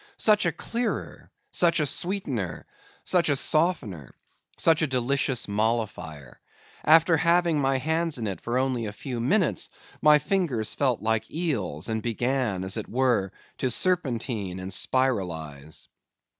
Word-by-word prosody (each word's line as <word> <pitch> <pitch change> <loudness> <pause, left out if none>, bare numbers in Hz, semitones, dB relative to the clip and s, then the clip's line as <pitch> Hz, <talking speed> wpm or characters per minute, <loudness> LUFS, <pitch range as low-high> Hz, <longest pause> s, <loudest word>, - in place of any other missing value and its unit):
Such 210 -4 +4
a - - +2
clearer! 235 +9 -4 0.2
such 170 -1 +3
a 150 - +2
sweetener! 140 - -2 0.4
such 175 -3 +2
a 145 - +3
softener! 135 - -1 0.4
such 165 -1 +4
a 155 - +2
delicious 135 0 0
molifier! 100 - -2 0.5
After 165 +1 +5
having 170 -1 +3
my 135 0 +2
hands 160 +2 0
in 115 - -3
it 95 -5 -4
for 120 +2 -2
only 130 -3 0
a 105 - -6
few 125 +2 -5
minutes, 140 - +1 0.3
my 150 0 +7
fingers 150 - -1
felt 130 -6 0
like 110 0 0
eels, 115 - -2
and 110 -1 -2
began, 120 -3 -1
as 95 +3 -2
it 110 - -4
were, 120 -6 +1 0.3
to 130 - 0
serpentine 120 - 0
and 95 +1 -6
spiralise. 80 - -2
130 Hz, 140 wpm, -26 LUFS, 105-160 Hz, 0.5 s, my